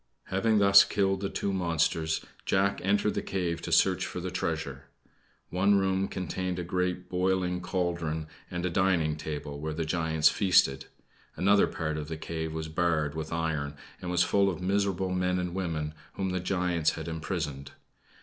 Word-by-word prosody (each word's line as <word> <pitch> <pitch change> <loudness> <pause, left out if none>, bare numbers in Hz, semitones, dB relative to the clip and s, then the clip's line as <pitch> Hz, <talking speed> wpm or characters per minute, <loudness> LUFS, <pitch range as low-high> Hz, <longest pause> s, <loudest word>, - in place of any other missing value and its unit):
Having 110 +3 +2
thus 100 -1 +8
killed 95 -1 +1
the 100 0 -2
two 100 - -2
monsters 80 -3 0 0.2
Jack 100 +1 +1
entered 100 +2 +2
the - - -1
cave 90 -3 -2
to - - -5
search - - +4
for - - -4
the - - -4
treasure. - - -3 0.7
One 100 +3 +3
room 95 0 +1
contained 90 0 -3
a 90 - -2
great 90 0 -1
boiling 90 0 0
cauldron 85 -4 -2 0.2
and 90 0 -3
a 90 - 0
dining 85 -4 +2
table, 75 -2 -5
where 75 +1 -4
the 80 0 -2
giants 80 -1 +2
feasted. 70 -9 +3 0.5
Another 100 +2 +4
part 80 -2 -3
of 75 - -5
the 80 0 -5
cave 80 0 -4
was 80 0 -4
barred 80 -2 0
with 80 0 -5
iron 80 -3 -2 0.3
and 90 - -4
was 90 -1 +3
full 100 -1 +3
of 90 - -4
miserable 95 0 0
men 90 0 +1
and 90 -1 -2
women 80 -5 -2 0.2
whom 95 -1 -2
the 90 - -1
giants 90 -3 +1
had 80 0 -6
imprisoned. 80 -4 -4
90 Hz, 170 wpm, -29 LUFS, 80-95 Hz, 0.7 s, thus